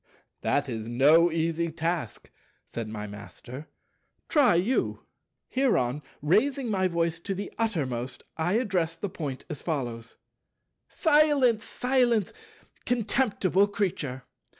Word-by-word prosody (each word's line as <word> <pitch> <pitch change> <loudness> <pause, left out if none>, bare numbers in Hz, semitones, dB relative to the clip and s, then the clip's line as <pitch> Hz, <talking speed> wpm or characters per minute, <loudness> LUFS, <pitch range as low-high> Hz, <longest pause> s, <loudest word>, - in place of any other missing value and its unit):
"That - - +1
is 110 -1 -4
no 150 +8 +5
easy 165 +1 0
task," 165 -6 -3 0.3
said 115 -2 -5
my 105 -1 -5
Master; 105 +7 -9 0.6
"try 275 - +5
you." 200 +10 0 0.4
Hereon, 150 - +1 0.2
raising 240 - +2
by 190 -2 +2
voice 170 -1 0
to 195 +3 -3
the 200 +2 -6
uttermost, 130 - -2
I 165 +3 0
addressed 180 -8 0
the 205 - -2
Point 145 -7 -5
as 145 - -6
follows: 120 -8 -4 0.7
"Silence, 290 - +3
silence, 245 -4 +1 0.5
contemptible 210 -5 +2
Creature. 165 -11 -2
170 Hz, 110 wpm, -27 LUFS, 135-220 Hz, 0.7 s, no